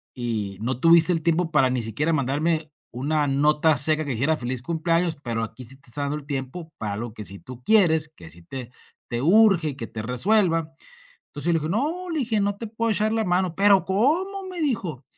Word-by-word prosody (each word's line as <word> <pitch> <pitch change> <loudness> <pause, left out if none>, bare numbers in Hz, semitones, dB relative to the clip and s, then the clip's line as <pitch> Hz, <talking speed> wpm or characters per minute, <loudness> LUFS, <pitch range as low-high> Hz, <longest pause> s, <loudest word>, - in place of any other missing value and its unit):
y 110 -5 -3
no 125 +2 -2
tuviste 165 +3 +6
el 165 - -1
tiempo 170 0 +1
para 135 -5 +3
ni 125 -1 -1
siquiera 115 +9 -1
mandarme 155 +3 0 0.2
una 145 +4 0
nota 150 +3 +3
seca 155 +1 +5
que 140 - -3
dijera, 140 +7 +1
feliz 125 -1 -3
cumpleaños. 165 +3 0
Pero 115 -1 -2
aquí 115 +3 -8
sí 130 +4 -7
te 135 - -15
está 145 +5 -3
dando 140 +1 -2
el 150 - -10
tiempo 145 +4 -5
para 105 -2 -4
algo 110 +2 -5
que 105 -1 -8
sí 100 0 -6
tú 125 -1 -11
quieres 160 - +4
que 85 - -12
sí 85 - -14
te 125 +5 -8 0.4
te 120 -1 -2
urge, 185 0 +4
y 140 - -6
que 135 - -6
te 110 - -6
resuelva. 165 - +1 0.6
Entonces 145 +2 -4
yo 170 - +3
le - - +3
dije: 155 +2 -3
"No, 320 - -2
le 320 -2 -1
dije 225 -4 0
no 200 0 0
te 230 - -6
puedo 230 +1 -2
echar 210 +2 0
la 225 0 0
mano". 180 -2 0
"Pero, 200 -1 +5
¿cómo?", 335 - 0
me 360 -2 -6
dijo. 185 - -2
155 Hz, 220 wpm, -24 LUFS, 130-190 Hz, 0.6 s, tuviste